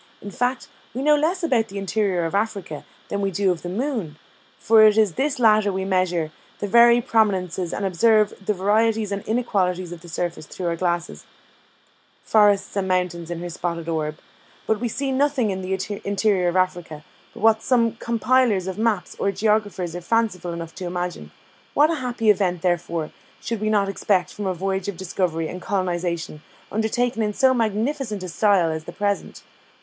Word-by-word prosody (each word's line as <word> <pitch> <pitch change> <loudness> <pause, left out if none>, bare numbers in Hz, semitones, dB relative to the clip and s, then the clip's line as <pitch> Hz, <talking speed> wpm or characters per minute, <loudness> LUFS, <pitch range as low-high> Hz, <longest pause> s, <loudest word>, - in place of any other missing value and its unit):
In 205 - -8
fact, 245 +5 -1 0.3
we 260 - -2
know 300 +1 +5
less 335 +5 0
about 245 -9 +2
the 200 - -8
interior 195 -3 0
of 165 - -3
Africa 200 -7 -2 0.2
than 200 - -2
we 195 - +1
do 195 0 +1
of 175 - -4
the 175 - -5
moon; 210 - -3 0.4
for 220 -1 +5
in 215 -2 +5
this 280 +1 0
latter 215 -4 +4
we 190 0 -3
measure 180 -4 0 0.3
the - - -3
very 235 +3 +6
prominences, 190 -7 0
and 200 - -3
observe 210 +3 +3
the 210 +2 0
varieties 215 +2 +1
and 200 0 -2
inequalities 185 -6 0
of 175 -2 -8
the 175 - -12
surface 170 -2 -4
through 185 - -6
our 170 -1 0
glasses 175 0 -2 1.0
"Forests 205 -3 +3
and 195 -2 -1
mountains 180 -2 -1
on 170 -1 -4
her 175 - -5
spotted 170 -1 -4
orb. 155 -2 -2 0.5
"But 220 - 0
we 240 - -1
see 270 +4 -2
nothing 265 -5 +1
in 190 0 -4
the 190 +2 -3
interior 200 -2 +1
of 175 - 0
Africa, 175 -5 -1 0.3
but - - -10
what 220 0 +5
some 235 -3 +2
compilers 235 -3 +2
of 190 +2 -5
maps 215 -6 0
or 200 - +1
geographers 205 -4 0
are 175 - -5
fanciful 185 -3 0
enough 170 -1 -6
to 185 - -5
imagine. 175 0 -4 0.5
What 300 +3 +5
a - - 0
happy 240 -3 +2
event, 180 -4 0
therefore, 170 -3 -1 0.3
should 230 -2 -4
we 215 - 0
not 205 -2 +2
expect 195 -2 0
from 205 -1 -4
a 185 - -1
voyage 190 +2 -2
of 200 -4 -4
discovery 175 -3 -2
and 180 +2 -7
colonisation 175 -6 -2 0.3
undertaken 225 +2 0
in 210 -1 0
so 265 -1 +4
magnificent 225 -1 -1
a 185 - -5
style 185 -2 +3
as 160 0 -5
the - - -8
present! 205 -1 -2
200 Hz, 185 wpm, -23 LUFS, 180-225 Hz, 1.0 s, very